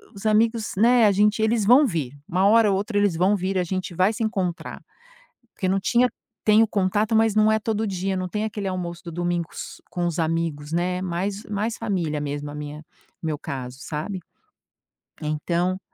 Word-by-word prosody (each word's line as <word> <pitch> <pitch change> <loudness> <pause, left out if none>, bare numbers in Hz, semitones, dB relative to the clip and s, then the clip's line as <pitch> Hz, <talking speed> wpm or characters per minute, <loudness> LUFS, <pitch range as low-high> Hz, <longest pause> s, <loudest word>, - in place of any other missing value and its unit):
os 195 - -10
amigos, 220 +1 +2
né, 235 +2 +5
a - - +5
gente 210 +3 +3
eles 220 -1 +2
vão 255 +7 +7
vir, 155 - -3
uma 185 +3 +1
hora 220 0 +5
ou 190 - +2
outra, 205 +2 -2
eles 205 -4 +2
vão 185 +5 +3
vir, 190 0 -1
a - - +2
gente 185 0 -4
vai 185 +5 +3
se 230 +1 -3
encontrar, 190 -6 -2 0.8
porque 190 - -2
não 195 +1 +2
tinha 240 +5 +3 0.4
tenho 215 +1 +5
contato, 205 +3 +1
mas 220 -1 +3
não 215 0 +4
é 220 - +3
todo 220 0 -1
dia, 190 -1 -2
não 185 0 -2
tem 210 +3 -2
aquele 210 -2 -3
almoço 175 -2 -4
do 170 - -6
domingo 175 0 -1
s - - -8
com 175 -1 -1
os 170 0 -2
amigos, 160 -2 -1
né, 180 +2 0
mais 190 +3 -2
mais 215 +2 -2
família 175 -9 -1
mesmo, 145 0 -4
a - - -9
minha, 150 +1 -7 0.4
meu 160 -2 -1
caso, 130 -4 -6
sabe. 165 +4 -4 1.0
Então, 170 +4 -1
190 Hz, 190 wpm, -24 LUFS, 170-215 Hz, 1.0 s, vão